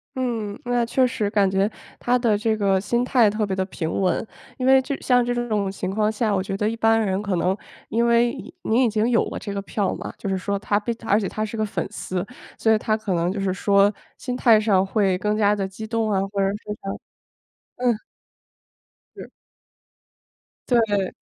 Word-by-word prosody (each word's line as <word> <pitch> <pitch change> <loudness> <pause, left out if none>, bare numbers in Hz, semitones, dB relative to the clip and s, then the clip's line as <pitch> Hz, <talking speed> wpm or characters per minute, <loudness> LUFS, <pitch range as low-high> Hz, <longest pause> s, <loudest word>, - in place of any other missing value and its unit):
嗯， 230 -5 -3
那 245 -1 +1
确 255 +2 +2
实， 210 -4 -1
感 205 -2 +2
觉 195 +3 +1 0.3
他 250 +1 +1
的 225 -4 +2
这 220 0 0
个 195 -2 +2
心 235 +4 0
态 245 -4 +4
特 215 +1 -1
别 195 -2 -2
的 190 - 0
平 160 -4 -4
稳， 185 +4 0 0.3
因 255 - -1
为 265 0 +6
就 265 - -4
像 245 -1 +3
这 245 - 0
种 205 -3 0
情 190 -1 -4
况 210 +2 +1
下， 215 -1 0
我 185 - 0
觉 195 0 -4
得 210 - 0
一 225 - -3
般 225 0 +3
人 195 -2 0
可 200 -4 -1
能 185 +3 +1 0.3
因 235 +2 +1
为 235 0 +3
你 - - -10
你 235 +4 +3
已 240 - +3
经 220 +2 +1
有 235 - +3
了 - - -5
这 205 - -6
个 200 - -3
票 195 0 -2
嘛， - - -7
就 - - -6
是 190 -1 0
说 200 +1 -2
他 205 0 0
被 210 +3 -2
而 205 - +4
且 205 -3 -1
他 215 - -2
是 220 - -7
个 215 -1 0
粉 205 - -3
丝， 185 0 -4 0.3
所 220 - +1
以 - - +4
他 215 0 0
可 215 -3 -3
能 170 +1 +1
就 200 - -4
是 195 -1 0
说 200 +1 +3 0.2
心 250 -1 -4
态 230 -3 +5
上 200 -3 +3
会 195 -2 +1
更 210 +2 -1
加 210 -1 +3
地 195 -2 -2
激 195 +3 -7
动 225 -1 0
啊， 195 - +2
或 200 - 0
者 195 - +2
是 200 - -2 0.3
他 195 - -4 0.9
嗯。 235 -3 +2 1.1
是。 - - -10 1.4
对。 210 -6 +2
210 Hz, 235 characters per minute, -23 LUFS, 195-230 Hz, 1.4 s, 为